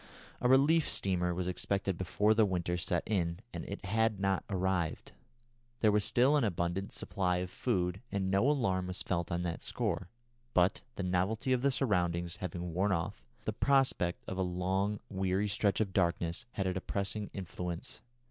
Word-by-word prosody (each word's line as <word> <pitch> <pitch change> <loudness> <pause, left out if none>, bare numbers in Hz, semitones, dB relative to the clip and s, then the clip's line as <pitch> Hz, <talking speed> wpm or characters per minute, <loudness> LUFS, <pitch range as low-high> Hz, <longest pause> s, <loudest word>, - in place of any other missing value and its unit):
A 125 - +3
relief 145 +5 +5
steamer 90 -2 +1
was 90 +1 -2
expected 95 +1 0
before 100 +4 +2
the 110 0 +4
winter 90 -3 0
set 85 - 0
in, 85 -5 0 0.2
and - - -4
it 100 0 -6
had 110 +1 +1
not 95 -1 +1
arrived. 95 -4 -1 0.7
There 110 - +5
was 105 0 +3
still 130 +8 +4
an 145 - +3
abundant 90 -1 -1
supply 90 -2 -1
of 90 0 -3
food, 90 -5 -1
and 95 -2 -1
no 100 +8 +4
alarm 95 -11 +1
was 90 0 -1
felt 85 -2 -1
on 85 +1 0
that 85 -1 -3
score; - - -2 0.5
but 90 +1 +3
the 100 - -3
novelty 95 +8 +1
of 125 - +1
the 140 - +3
surroundings 90 -10 0
having 90 -2 -4
worn 95 +4 +2
off, 90 +3 -2 0.2
the 110 - -1
prospect 130 -9 +2
of 95 - -4
the 95 - +1
long, 95 +3 0
weary 95 +1 0
stretch 100 0 +1
of 100 -4 0
darkness 85 +3 0
had 95 - -1
a 95 - +1
depressing 100 +2 -2
influence. 90 +1 -5
95 Hz, 175 wpm, -32 LUFS, 90-105 Hz, 0.7 s, relief